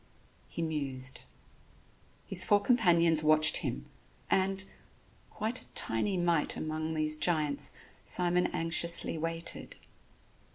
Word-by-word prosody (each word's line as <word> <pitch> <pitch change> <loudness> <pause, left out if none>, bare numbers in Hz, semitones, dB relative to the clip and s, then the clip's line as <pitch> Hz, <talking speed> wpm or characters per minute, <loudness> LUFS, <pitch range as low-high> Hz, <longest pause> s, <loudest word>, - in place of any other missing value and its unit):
He 170 - -5
mused. 135 -5 -3 1.0
His 185 -1 +4
four 205 0 +3
companions 170 -9 +3
watched 155 0 +4
him, 60 0 -4 0.5
and, 190 0 +1 0.7
quite 225 +4 -3
a - - -12
tiny 185 - +1
mite 170 -3 0
among 155 +1 -4
these 155 0 +1
giants, 150 -3 0 0.3
Simon 180 0 +1
anxiously 165 +1 +1
waited. 165 +1 -3
165 Hz, 100 wpm, -30 LUFS, 155-180 Hz, 1.0 s, His